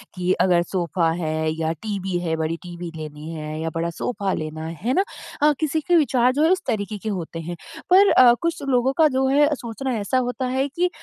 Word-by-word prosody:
कि 180 Hz, 0 st, 0 dB
अगर 175 Hz, -2 st, +4 dB
सोफ़ा 175 Hz, -2 st, 0 dB
है 160 Hz, -2 st, -1 dB
या 160 Hz, 0 st, 0 dB
टीवी 195 Hz, -4 st, -2 dB
है 165 Hz, -2 st, -1 dB
बड़ी 160 Hz, +1 st, -2 dB
टीवी 175 Hz, -1 st, -7 dB
लेनी 155 Hz, 0 st, -8 dB
है 155 Hz, -1 st, -5 dB
या 165 Hz, -, -1 dB
बड़ा 165 Hz, +1 st, -1 dB
सोफ़ा 195 Hz, +2 st, -2 dB
लेना 155 Hz, 0 st, -4 dB, 0.2 s
है 245 Hz, +3 st, +1 dB
ना? 385 Hz, -, +3 dB, 0.4 s
अ, 300 Hz, -, +6 dB
किसी 310 Hz, 0 st, 0 dB
के 350 Hz, +3 st, +2 dB
विचार 255 Hz, -6 st, +3 dB
जो 295 Hz, +3 st, +1 dB
है 325 Hz, -, +4 dB
उस 370 Hz, -, +2 dB
तरीके 210 Hz, -2 st, -2 dB
के 220 Hz, -, -5 dB
होते 170 Hz, -4 st, -4 dB
हैं। 170 Hz, +2 st, -5 dB, 0.3 s
पर 390 Hz, +2 st, +7 dB
अ, 245 Hz, -2 st, +7 dB
कुछ 335 Hz, -3 st, -1 dB
लोगों 255 Hz, +1 st, +2 dB
का 320 Hz, -, +6 dB
जो 265 Hz, -, +2 dB
है 290 Hz, +2 st, +4 dB
सोचना 250 Hz, +2 st, -4 dB
ऐसा 205 Hz, +6 st, 0 dB
होता 250 Hz, +1 st, -3 dB
है 265 Hz, +2 st, 0 dB
कि 360 Hz, +1 st, +2 dB
200 Hz, 220 wpm, -22 LUFS, 165-265 Hz, 0.4 s, पर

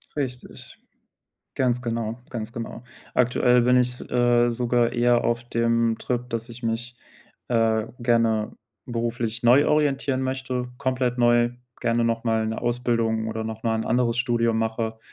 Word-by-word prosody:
Richtig. 130 Hz, -4 st, -6 dB, 0.8 s
Ganz 125 Hz, -1 st, +1 dB
genau, 115 Hz, 0 st, -3 dB
ganz 115 Hz, -2 st, -5 dB
genau. 115 Hz, 0 st, -7 dB, 0.3 s
Aktuell 125 Hz, 0 st, +3 dB
bin 125 Hz, +1 st, +4 dB
ich 125 Hz, 0 st, +2 dB
s -, -, -8 dB
äh, 120 Hz, 0 st, +3 dB
sogar 120 Hz, 0 st, +1 dB
eher 120 Hz, 0 st, +2 dB
auf 120 Hz, 0 st, 0 dB
dem 115 Hz, -1 st, +1 dB
Trip, 125 Hz, 0 st, -3 dB
dass 115 Hz, +1 st, -4 dB
ich 120 Hz, +1 st, -11 dB
mich, 115 Hz, +2 st, -3 dB, 0.5 s
äh, 115 Hz, -2 st, +2 dB, 0.2 s
gerne 115 Hz, -2 st, +1 dB, 0.3 s
beruflich 115 Hz, -1 st, -3 dB
neu 130 Hz, +5 st, +5 dB
orientieren 140 Hz, -3 st, +1 dB
möchte, 130 Hz, -1 st, -3 dB
komplett 130 Hz, -2 st, -1 dB
neu, 120 Hz, 0 st, +4 dB, 0.3 s
gerne 120 Hz, -1 st, +1 dB
nochmal 115 Hz, -1 st, 0 dB
'ne 110 Hz, -, -4 dB
Ausbildung 115 Hz, -2 st, 0 dB
oder 110 Hz, 0 st, -3 dB
nochmal 110 Hz, 0 st, -2 dB
'n -, -, -3 dB
anderes 120 Hz, 0 st, +1 dB
Studium 115 Hz, -2 st, +1 dB
mache. 110 Hz, 0 st, -2 dB
120 Hz, 145 wpm, -24 LUFS, 115-125 Hz, 0.8 s, neu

